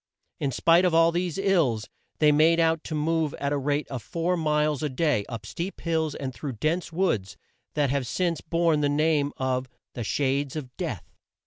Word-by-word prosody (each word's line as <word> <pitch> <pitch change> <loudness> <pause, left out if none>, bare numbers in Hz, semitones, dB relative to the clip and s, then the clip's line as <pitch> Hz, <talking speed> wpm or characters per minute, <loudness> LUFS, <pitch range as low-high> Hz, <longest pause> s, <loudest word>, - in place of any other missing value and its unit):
In 140 - 0
spite 165 +7 +4
of 180 -3 +2
all 165 0 +5
these 175 0 -2
ills 165 - +1 0.3
they 150 -1 +5
made 160 +3 +4
out 165 -1 +2
to 155 - -4
move 160 0 0
at 140 - -2
the 145 0 0
rate 145 +2 -1
of 130 -3 -4
four 170 +6 -1
miles 150 -3 +1
a 150 - -1
day, 135 -6 +1
up 115 -3 -6
steep 170 - -5
hills, 160 -3 0
and 130 -2 -4
through 135 +3 -5
dense 155 +10 -1
woods 160 - -1 0.4
that 145 -3 +2
have 135 -3 -1
since 175 +3 -1
borne 165 -2 +1
the 145 - +2
name 145 -1 +2
of 130 -1 -1 0.2
"The 120 - -4
Shades 140 +4 0
of 130 -5 -6
Death." - - -5
150 Hz, 195 wpm, -26 LUFS, 135-165 Hz, 0.4 s, all